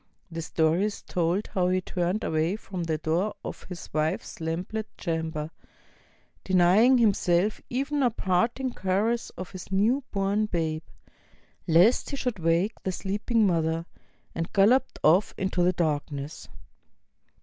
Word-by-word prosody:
The 165 Hz, 0 st, -4 dB
story 165 Hz, +4 st, +1 dB
is 210 Hz, -, -4 dB
told 175 Hz, +4 st, 0 dB
how 180 Hz, -2 st, +2 dB
he 185 Hz, 0 st, +2 dB
turned 180 Hz, +3 st, -2 dB
away 160 Hz, +4 st, 0 dB
from 190 Hz, -4 st, -6 dB
the 160 Hz, -1 st, -1 dB
door 170 Hz, +7 st, -1 dB
of -, -, -7 dB
his 180 Hz, -3 st, -8 dB
wife's 155 Hz, +2 st, -2 dB
lamplit 180 Hz, +7 st, -3 dB
chamber, 160 Hz, -2 st, -3 dB, 0.9 s
deny 185 Hz, +2 st, +4 dB
ing 255 Hz, +2 st, +6 dB
himself 205 Hz, -3 st, +2 dB
even 280 Hz, +3 st, -1 dB
a 250 Hz, -, +4 dB
parting 235 Hz, +6 st, 0 dB
caress 210 Hz, +5 st, 0 dB
of 185 Hz, -, -7 dB
his 185 Hz, 0 st, -9 dB
new 225 Hz, +8 st, +2 dB
born 200 Hz, +2 st, 0 dB
babe, 160 Hz, -4 st, -1 dB, 0.9 s
lest 175 Hz, +9 st, +4 dB
he 280 Hz, -, -3 dB
should 250 Hz, -7 st, -2 dB
wake 170 Hz, +6 st, +1 dB
the 190 Hz, -, -2 dB
sleeping 210 Hz, +4 st, 0 dB
mother, 165 Hz, -2 st, 0 dB, 0.5 s
and 165 Hz, 0 st, -4 dB
galloped 240 Hz, +7 st, +3 dB
off 175 Hz, +7 st, +4 dB
into 190 Hz, -2 st, 0 dB
the 180 Hz, +1 st, +4 dB
darkness. 150 Hz, -3 st, -3 dB
185 Hz, 140 wpm, -27 LUFS, 165-215 Hz, 0.9 s, ing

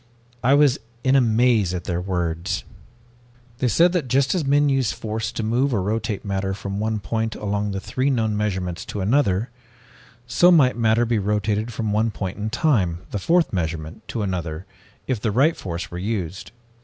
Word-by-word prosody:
I 135 Hz, +4 st, +5 dB
was 145 Hz, -3 st, +4 dB, 0.2 s
in 130 Hz, 0 st, +3 dB
a 135 Hz, -, +6 dB
maze 110 Hz, -5 st, +2 dB
at 90 Hz, -, -4 dB
their 90 Hz, -1 st, -2 dB
words. 90 Hz, -1 st, -2 dB, 1.0 s
"They 130 Hz, -, +1 dB
said 170 Hz, -, +4 dB
that 175 Hz, -7 st, -1 dB
just 135 Hz, +2 st, +2 dB
as 180 Hz, -4 st, 0 dB
men 145 Hz, +1 st, +3 dB
use 135 Hz, -4 st, +2 dB
force 110 Hz, 0 st, -4 dB
to 115 Hz, -, -3 dB
move 120 Hz, +4 st, +1 dB
or 100 Hz, -, +1 dB
rotate 110 Hz, 0 st, -2 dB
matter 95 Hz, -1 st, -2 dB
from 100 Hz, 0 st, -5 dB
one 110 Hz, 0 st, -1 dB
point 110 Hz, +2 st, -2 dB
along 105 Hz, 0 st, -2 dB
the 95 Hz, -1 st, -3 dB
three 130 Hz, +7 st, -1 dB
known 110 Hz, -5 st, +1 dB
measurements 95 Hz, -4 st, -2 dB
to 105 Hz, -, -5 dB
another, 110 Hz, -1 st, +1 dB, 0.7 s
so 125 Hz, +9 st, +4 dB
might 145 Hz, -8 st, +5 dB
matter 115 Hz, 0 st, +2 dB
be 115 Hz, -2 st, +1 dB
rotated 105 Hz, +2 st, -1 dB
from 110 Hz, -2 st, -2 dB
one 110 Hz, +2 st, +2 dB
point 95 Hz, -2 st, -5 dB
in 105 Hz, +1 st, -2 dB
time, 105 Hz, -, +1 dB
the 105 Hz, -, -2 dB
fourth 170 Hz, -, +2 dB
measurement, 80 Hz, -2 st, -4 dB
to 110 Hz, -, -3 dB
another, 90 Hz, -3 st, -3 dB, 0.4 s
if 125 Hz, -6 st, -2 dB
the 115 Hz, -, 0 dB
right 140 Hz, +10 st, +3 dB
force 85 Hz, -2 st, -5 dB
were 90 Hz, -, -5 dB
used. 95 Hz, -3 st, -3 dB
110 Hz, 185 wpm, -23 LUFS, 95-125 Hz, 1.0 s, a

